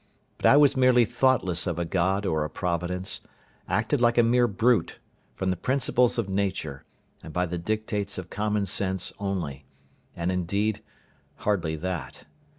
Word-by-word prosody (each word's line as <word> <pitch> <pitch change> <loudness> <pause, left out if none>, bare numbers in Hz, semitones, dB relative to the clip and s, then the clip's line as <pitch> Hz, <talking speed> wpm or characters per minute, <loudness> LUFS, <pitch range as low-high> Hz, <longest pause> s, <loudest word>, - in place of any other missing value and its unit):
But - - +3
I 140 - +7
was 145 -2 +5
merely 125 -2 +5
thoughtless 100 -10 +1
of 85 -2 -2
a 85 - -1
God 95 +4 0
or 80 -5 0
a 75 - -3
Providence, 90 +1 -2 0.5
acted 110 - +1
like 120 0 +3
a 120 - +6
mere 120 +1 +3
brute, 115 -2 +1 0.4
from 95 -1 -1
the - - 0
principles 125 +2 +1
of 115 -4 -1
nature, 95 -8 -2 0.4
and 80 - -10
by 90 +3 0
the 90 0 -4
dictates 105 +1 -2
of 90 -1 -7
common 105 -1 0
sense 95 -1 -1
only, 85 -9 -4 0.5
and, 85 +2 -1
indeed, 100 +4 -1 0.5
hardly 90 -6 -1
that. 90 +2 -5
95 Hz, 155 wpm, -26 LUFS, 90-115 Hz, 0.5 s, I